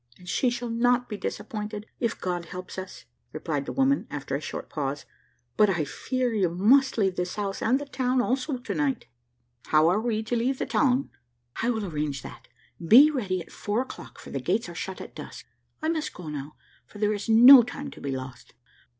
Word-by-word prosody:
"And 180 - -16
she 250 +7 +1
shall 240 -1 -4
not 245 +1 +2
be 210 - -3
disappointed, 210 0 -5
if 230 -1 -1
God 175 -2 -3
helps 180 +2 -7
us," 185 0 -9 0.3
replied 155 -3 -3
the - - -3
woman, 270 +1 +1
after 140 -2 -4
a 140 - -3
short - - -6
pause; 140 -1 -4 0.5
"but 210 -1 +5
I 170 -5 0
fear 255 - -2
you 195 -5 +2
must 240 +11 +4
leave 190 -4 +1
this 180 0 -2
house 200 -2 -3
and 250 +4 +3
the 290 - -5
town 255 -2 0
also 260 +3 0
to 245 - -5
night." 275 -5 -1 0.6
"How 155 +1 +4
are 200 +5 +2
we 220 -2 -1
to 230 +2 -2
leave 250 +3 0
the - - -2
town?" 265 -1 +1 0.5
"I 235 - +1
will 220 -4 -1
arrange 150 -6 -3
that; - - -11 0.4
be 260 - +8
ready 195 -10 -2
at 165 - -13
four 210 +4 -1
o'clock, 260 - -11
for - - -11
the 135 - -2
gates 190 - 0
are 170 - -8
shut 190 +3 -6
at - - -10
dusk. - - -9 0.4
I - - +1
must 315 -2 -2
go 175 -3 -8
now, 145 0 -6 0.3
for - - -14
there 210 0 +1
is 205 +1 -5
no 245 +4 +10
time 275 +4 -6
to - - -12
be 140 - -4
lost." 130 -1 -7
215 Hz, 210 wpm, -26 LUFS, 175-250 Hz, 0.6 s, no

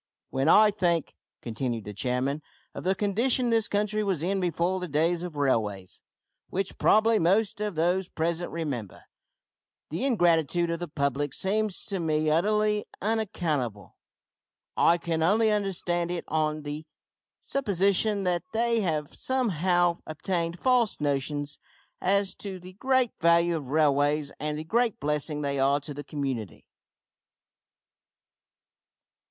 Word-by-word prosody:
"When 135 +3 +1
I 210 +3 +7
think," 175 -6 0 0.3
continued 115 0 -3
the 105 - -7
chairman, 130 +6 -1 0.3
"of - - -7
the 190 +1 +1
condition 235 +5 +1
this 225 -1 +2
country 210 +1 0
was 190 -6 -1
in 195 +2 0
before 180 +1 0
the 180 - -4
days 165 +3 +1
of 175 -3 -6
railways 105 -9 -1 0.5
which 195 +1 -3
probably 220 +1 +4
most 200 +5 +2
of 210 -4 -2
those 175 +3 +1
present 170 +2 -2
remember 135 - -5 0.9
the 165 +8 -2
ingratitude 175 - +2
of 170 - -2
the 175 - -4
public 140 -1 -1
seems 210 0 -1
to 195 -2 -3
me 155 -2 +1
utterly 210 +5 +1
unaccountable. 160 - -2 0.8
I 170 - +4
can 165 -1 -2
only 215 +6 +3
understand 180 -4 -1
it 175 -1 -3
on 155 -1 -1
the 150 +2 -6 0.6
supposition 200 -4 +1
that 175 -2 +1
they 230 0 +2
have 155 -6 -2
somehow 180 -8 +1
obtained 170 +2 -2
false 250 -4 +2
notions 145 0 -2 0.4
as 200 +1 +2
to 195 -2 -6
the 180 +1 -12
great 260 +3 +1
value 170 +1 +4
of 150 -5 -5
railways 145 0 +2
and 150 +1 -2
the 155 - -4
great 230 +6 0
blessing 150 +1 -1
they 140 -1 -1
are 140 +2 +3
to 145 +1 -6
the 145 +1 -7
community. 130 - -4
170 Hz, 135 wpm, -27 LUFS, 150-200 Hz, 0.9 s, I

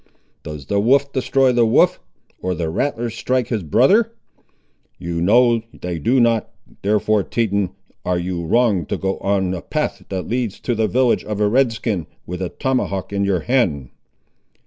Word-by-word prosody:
Does 75 -3 -8
the 100 +8 0
wolf 140 +6 +3
destroy 135 0 +2
the 120 -1 +3
wolf, 110 - +3 0.4
or 90 0 -1
the 80 -1 -2
rattler 120 - -1
strike 125 +1 -1
his 110 -4 -1
brother? 135 - +3 0.9
You 85 -1 -4
know 115 +5 +4 0.2
they 90 -2 -4
do 125 - +2
not; 115 -2 +2 0.3
therefore, 105 +1 +2
Teton, 100 -3 -1 0.3
are 90 -1 0
you 85 0 -3
wrong 100 -2 +2
to - - -2
go 95 0 -2
on 95 -2 0
a 90 - -4
path - - -3
that 95 -1 -4
leads 120 -4 -2
to 120 - -1
the 110 -1 +1
village 125 +4 +2
of 105 -1 -4
a 105 - +3
Red 125 +3 +3
skin, 105 -6 -3 0.2
with 90 +1 -6
a 90 - -2
tomahawk 125 -8 -2
in 100 0 0
your 95 -4 +1
hand." 90 - 0
105 Hz, 170 wpm, -20 LUFS, 90-120 Hz, 0.9 s, know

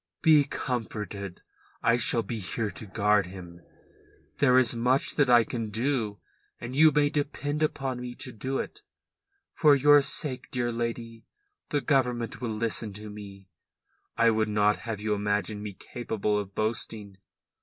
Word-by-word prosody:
"Be 155 -3 +6
comforted. 105 -7 -4 0.4
I 115 - +4
shall 115 -1 +2
be 110 +2 -4
here 105 +3 -2
to 110 - -9
guard 105 -1 +2
him. 90 -2 -10 0.8
There 130 -3 +5
is 125 -3 +4
much 125 +3 +1
that 145 -3 +2
I 120 -1 +7
can 115 -1 -4
do 110 -2 -1 0.4
and 120 +2 -6
you 155 +2 +7
may 145 0 +2
depend 145 0 -2
upon 135 -4 -1
me 125 0 -6
to 130 - -6
do 130 +4 -3
it 420 - -5 0.7
for 150 -2 +5
your 145 +1 +6
sake, 135 -1 -4
dear 120 -3 -1
lady. 115 -1 -4 0.4
The 145 - 0
Government 125 -6 0
will 120 - -2
listen 110 -1 -2
to 105 +1 -8
me. 100 -2 -11 0.7
I 115 0 +5
would 110 0 +1
not 105 0 +3
have 115 -3 -5
you 105 0 -1
imagine 105 +1 -1
me 105 -1 -6
capable 105 -1 -2
of 100 -1 -7
boasting. 110 -2 -3
115 Hz, 155 wpm, -27 LUFS, 105-130 Hz, 0.8 s, I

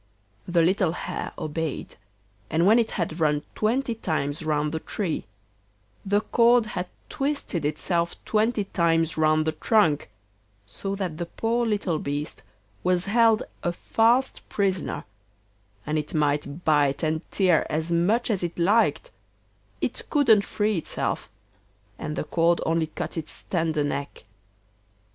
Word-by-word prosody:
The 175 -2 +3
little 180 -1 +2
Hare - - -4
obeyed, 155 0 -4 0.6
and 165 +3 +2
when 220 +4 +6
it 225 -1 +1
had 170 -2 -3
run 150 -2 +2
twenty 235 +3 0
times 155 -8 -2
round 150 -1 0
the 160 - -2
tree, 175 -1 -3 0.8
the 205 +1 +2
cord 235 +1 +4
had 180 - -2 0.2
twisted 275 - -2
itself 170 +3 0
twenty 215 0 +1
times 165 -4 +1
round 155 0 +3
the 160 - +1
trunk, 160 - +2 0.6
so 195 - -4
that 180 -5 -4
the 175 - -3
poor 230 +6 0
little 200 -7 0
beast 145 +1 -4 0.4
was 180 0 +2
held 225 +1 +4 0.2
a 175 - 0
fast 235 +8 +2
prisoner, 190 -4 -1 0.8
and 155 +1 0
it 150 +2 -5
might 150 +1 0
bite 145 -1 +3
and 155 0 0
tear 185 -5 +3
as 160 +2 -1
much 205 +9 +2
as 195 -4 -1
it 170 -1 -3
liked, 215 - +2 0.7
it - - -3
couldn't 230 -9 +4
free 210 -3 0
itself, - - -3 0.7
and 155 -1 -4
the - - -2
cord 170 +2 +2
only 165 0 +1
cut 155 - -5
its 160 -1 -6
tender 160 -4 +1
neck. 140 -3 -4
170 Hz, 140 wpm, -25 LUFS, 155-210 Hz, 0.8 s, when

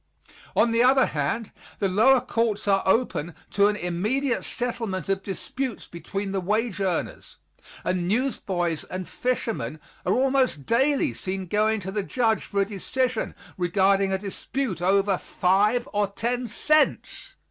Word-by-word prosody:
On 235 - +4
the 230 +1 +3
other 260 +1 +5
hand, 150 +10 -2 0.3
the 200 - +1
lower 240 +7 +5
courts 225 -4 -1
are 195 -1 +4
open 190 -7 +1 0.2
to 200 0 +4
an 210 - +1
immediate 215 +9 -1
settlement 230 -8 -3
of 195 0 +1
disputes 235 +5 -4
between 195 +4 -5
the 195 -1 -1
wage 210 +3 0
earners, 185 -4 -3 0.5
and 180 -1 -1
newsboys 190 - -1
and 185 -1 -6
fishermen 220 - -2 0.2
are 185 - +1
almost 260 - +1
daily 265 - +2
seen 190 +8 -4
going 215 +4 +1
to 190 +1 -5
the 205 +1 -1
judge 225 +2 0
for 200 -1 -1
a - - +2
decision 230 +4 -2 0.2
regarding 195 +2 +3
a 190 - +2
dispute 200 - -4
over 195 +1 +2
five 210 +7 +2
or 205 0 +2
ten 240 +5 -2
cents. 305 +7 +1
205 Hz, 145 wpm, -25 LUFS, 185-240 Hz, 0.5 s, other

